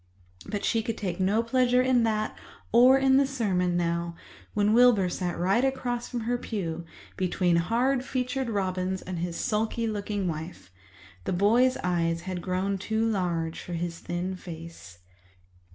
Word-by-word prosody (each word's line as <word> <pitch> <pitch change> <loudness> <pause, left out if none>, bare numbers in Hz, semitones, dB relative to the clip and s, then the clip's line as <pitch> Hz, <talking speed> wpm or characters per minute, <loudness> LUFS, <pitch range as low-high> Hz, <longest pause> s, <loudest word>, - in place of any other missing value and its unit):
But 205 - -3
she 225 - +2
could 225 0 -4
take 185 -3 -3
no 200 +5 +2
pleasure 250 +1 +3
in 255 -2 +3
that 215 -1 -1 0.4
or 250 +4 +7
in 265 0 +4
the 275 0 +4
sermon 185 -9 0
now, 170 0 -1 0.4
when 210 0 +3
Wilbur 230 -6 +5
sat 175 -1 -3
right 190 +8 +2
across 250 -3 -1
from 240 - -3
her 240 +2 -1
pew, 170 -8 -4 0.3
between 180 -1 +1
hard 245 +9 +1
featured 260 -1 -2
Robins 190 -2 -1
and 185 -2 -5
his 170 0 -3
sulky 225 +2 -1
looking 205 -2 -2
wife. 160 - -6 0.5
The - - -1
boy's 235 +8 +3
eyes 170 -2 0
had 180 0 -5
grown 190 +2 -1
too 220 +3 0
large 170 -6 -1
for 175 - -7
his 170 0 -3
thin 180 +2 -3
face. 165 - -10
200 Hz, 155 wpm, -27 LUFS, 175-235 Hz, 0.5 s, or